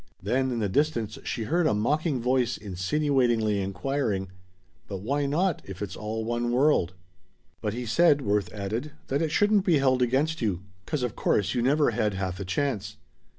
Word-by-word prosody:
Then 130 +7 0
in 120 - -2
the 110 -3 0
distance 120 -1 0
she 115 - -2
heard 165 +7 +1
a 105 - +2
mocking 145 +6 0
voice 125 -1 +1
insinuatingly 110 +1 +1
inquiring: 100 0 -2 0.6
"But 95 -2 -5
why 140 +6 0
not, 170 +4 +1
if 95 -1 -9
it's 100 -2 -5
all 110 +1 -4
one 120 +1 -1
world?" 125 - +2 0.7
"But 105 0 -2
he 125 0 -4
said," 145 +4 +4
Worth 100 -4 0
added, 110 +9 -4 0.2
"that 140 +3 +1
it 160 - +1
shouldn't 205 +4 +3
be 175 -6 +4
held 130 -2 +2
against 135 +6 +1
you, 95 -5 -1 0.2
'cause 150 -5 -1
of 120 -4 -2
course 100 - +1
you 120 - 0
never 145 +2 +3
had 105 -3 0
half 95 -1 -3
a 100 - -4
chance. 105 +3 -2
120 Hz, 180 wpm, -27 LUFS, 105-145 Hz, 0.7 s, said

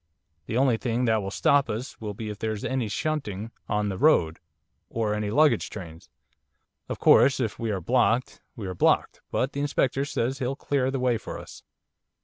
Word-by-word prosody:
The 110 - -1
only 130 -3 +3
thing 120 +1 -1
that 110 -2 +2
will 95 - -4
stop 140 +7 +2
us 115 +5 -5
will 105 -2 -5
be 110 +1 -5
if 105 - -9
there's 110 -2 -3
any 130 -3 -1
shunting 110 -4 -3 0.2
on 105 -1 0
the 95 - -4
road, 85 - +3 0.5
or 110 -2 -1
any 105 0 -2
luggage 145 0 +3
trains; 85 -3 -10 0.8
of - - -3
course, 135 -1 +5
if 115 -4 -2
we 115 - -2
are 100 -3 -1
blocked, 125 +4 +1
we 110 - -6
are 95 - -4
blocked, 85 - +1
but 135 +2 -1
the 140 - -3
Inspector 140 -1 0
says 135 -2 -2
he'll 130 0 -1
clear 135 -2 0
the 135 0 -2
way 125 -3 +1
for - - -7
us. - - -11
115 Hz, 190 wpm, -26 LUFS, 105-135 Hz, 0.8 s, course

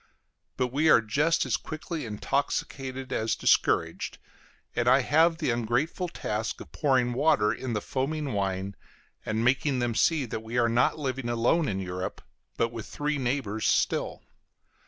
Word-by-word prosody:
But 125 -1 0
we 155 +3 +3
are - - +8
just 145 +10 +1
as - - +1
quickly 155 -2 -6
intoxicated 130 +3 -2
as 110 +1 0
discouraged, 80 0 +1 0.6
and - - 0
I - - +6
have 165 +2 +3
the 155 -6 0
ungrateful 120 - -1
task 110 -8 -3
of - - -11
pouring 130 -4 +2
water 120 -6 +3
in 130 -2 -4
the 105 - -1
foaming 140 +2 -2
wine, 95 0 -2 0.5
and 110 +1 0
making 130 +2 +2
them 120 -1 0
see 150 +4 +2
that 110 - -4
we 110 +2 -5
are 120 -1 +3
not 120 +5 +2
living 135 -4 -3
alone 120 +7 +2
in 95 -4 -1
Europe, 90 0 -5 0.3
but 115 - +2
with 115 -3 -7
three 150 0 -2
neighbors 120 -5 -1
still. - - 0
125 Hz, 155 wpm, -27 LUFS, 110-145 Hz, 0.6 s, are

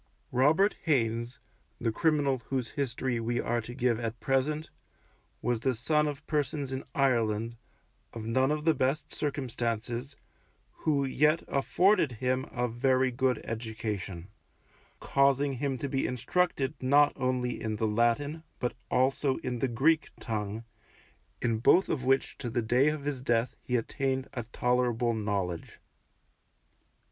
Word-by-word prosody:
Robert 155 +11 +3
Haynes, 120 -4 +1 0.4
the 115 - 0
criminal 145 -1 +2
whose 130 -3 -1
history 130 -3 -2
we 120 +1 -1
are 120 0 0
to 120 +2 -9
give 125 -3 +1
at 115 -1 -4
present, 150 +3 0 0.7
was 120 0 +1
the 130 +2 0
son 150 +6 +2
of 145 -2 -5
persons 145 -2 -1
in 130 0 -3
Ireland, 115 -4 +1 0.6
of 115 -2 -7
none 130 +4 +2
of 150 0 -1
the 160 - +5
best 135 +2 -1
circumstances, 125 -2 -3 0.6
who 145 -3 0
yet 150 +4 +2
afforded 175 +2 +3
him 130 +2 -1
a 125 -1 0
very 130 +2 +2
good 125 +1 +1
education, 110 -5 -5 0.7
causing 140 0 +2
him 135 0 -1
to 140 - -3
be 135 -1 0
instructed 135 +2 0
not 145 +3 +5
only 125 -2 -1
in 110 -1 -2
the 110 +1 0
Latin, 120 +8 +1 0.2
but 125 - -2 0.2
also 130 +1 +2
in 125 -1 -2
the 135 - +1
Greek 145 +7 +2
tongue, 110 -1 -3 0.8
in 115 -2 +1
both 180 - +5
of 130 - -1
which 135 +1 +1
to 120 - -3
the 120 0 -1
day 125 +5 +3
of 150 -2 -3
his 140 -3 -3
death 120 -1 +1
he 125 - -2
attained 130 +2 -1
a 120 -4 -4
tolerable 120 0 +1
knowledge. 100 -6 -3
130 Hz, 140 wpm, -29 LUFS, 115-140 Hz, 0.8 s, the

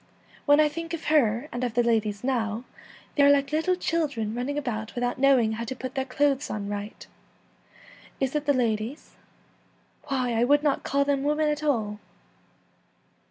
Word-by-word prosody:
' - - -27
When 290 +1 +6
I 305 - +6
think 330 +2 -5
of 325 - -10
her 235 -2 +2
and 240 +1 -4
of 240 -3 -2
the 240 - +3
ladies 215 -3 0
now, 235 -3 -1 0.5
they 290 - +2
are 280 - +7
like 280 0 +3
little 320 +4 +1
children 290 - -1
running 250 +5 -3
about 220 -6 -4
without 245 +1 -2
know 275 0 +5
ing 225 -3 +1
how 225 +1 -3
to 260 - -5
put 255 0 -6
their 265 -1 -2
clothes 280 +1 0
on 205 -2 -4
right. 205 +1 -6 1.1
Is 265 -1 -1
it 300 -1 -1
the - - +5
ladies? 235 +1 -2 0.9
Why, 255 -3 -1
I 230 +1 +2
would 290 +4 +3
not 290 -2 +1
call 280 0 0
them 280 -1 +1
women 300 +2 +1
at 300 0 -2
all.' 220 -8 -1
260 Hz, 185 wpm, -26 LUFS, 230-290 Hz, 1.1 s, are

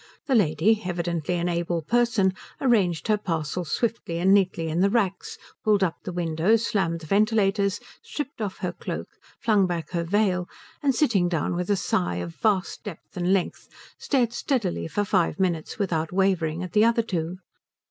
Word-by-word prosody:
The 275 - 0
lady, 205 +1 +3
evidently 175 -2 -2
an 175 0 -1
able 170 -1 -1
person, 225 -1 +2 0.3
arranged 195 - +2
her 215 -1 +2
parcels 165 -2 -3
swiftly 225 -7 -1
and 185 +3 +4
neatly 185 -4 +2
in 160 +2 -1
the 195 +2 +4
racks, 195 -4 -1 0.3
pulled 210 -2 +3
up 170 -3 0
the - - -5
windows, 175 +6 +1
slammed 170 -5 0
the - - -9
ventilators, 200 +1 +2 0.2
stripped 285 -5 -6
off 200 -3 -3
her 175 - -1
cloak, - - -6 0.3
flung 210 -4 +3
back 170 -2 -4
her 170 -2 -1
veil, 180 -1 +1 0.3
and 275 -3 +2
sitting 210 - +2
down 165 -1 -1
with 180 +2 -3
a 205 - +4
sigh 90 - 0
of 85 -1 -4
vast 195 -4 0
depth 205 -7 -9
and 180 +1 0
length 190 -2 -1 0.3
stared 245 -5 +1
steadily 240 - -1
for 205 +6 -1
five 185 -2 +1
minutes 170 -4 -1
without 165 -6 -1
wavering 180 -3 +1
at 185 - -7
the 210 0 +5
other 230 0 +3
two. 175 -4 -3
185 Hz, 175 wpm, -25 LUFS, 170-215 Hz, 0.3 s, the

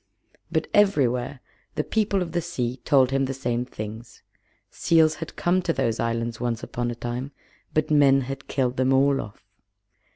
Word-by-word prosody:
But - - +1
everywhere 135 -10 +2 0.3
the - - 0
People 205 -3 +1
of 170 - -7
the 175 +1 0
Sea 125 -4 -3
told 135 -4 +4
him 135 0 +2
the 135 0 -3
same 120 -2 -1
things. 110 0 -8 0.5
Seals 160 -2 +3
had 165 - -6
come 180 +2 +1
to 175 -2 0
those 115 -6 -1
islands 115 0 -2
once 120 -2 -2
upon 120 0 -3
a 120 - -4
time, 120 +4 -5 0.4
but 155 0 +1
men 140 -2 +5
had 135 +1 -6
killed 130 -2 -1
them 130 +1 +3
all 135 +1 +3
off. 105 - -12
135 Hz, 170 wpm, -25 LUFS, 120-155 Hz, 0.5 s, men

